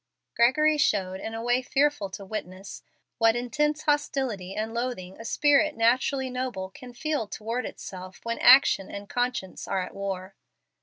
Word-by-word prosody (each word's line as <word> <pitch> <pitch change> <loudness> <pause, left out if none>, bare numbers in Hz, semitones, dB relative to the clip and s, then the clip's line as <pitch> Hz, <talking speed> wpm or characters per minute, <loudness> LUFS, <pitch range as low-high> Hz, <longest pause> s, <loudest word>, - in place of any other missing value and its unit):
Gregory 305 +6 +4
showed, 190 -7 +1
in 225 +3 -5
a 225 - -5
way 245 +1 +2
fearful 275 -5 +1
to 195 +1 -8
witness, 190 -2 -7 0.4
what 225 0 +4
intense 300 +5 0
hostility 265 -10 -1
and 220 +1 -3
loathing 235 -7 -4
a - - -7
spirit 295 +4 +3
naturally 255 +3 +2
noble 250 -7 -4
can 250 +5 -11
feel 290 -2 -2
toward 225 +5 -4
itself 185 0 -9
when 230 0 -3
action 250 -7 +6
and 200 0 -7
conscience 245 -6 -2
are 190 -1 0
at - - -8
war. 195 -1 -5
235 Hz, 155 wpm, -27 LUFS, 195-260 Hz, 0.4 s, action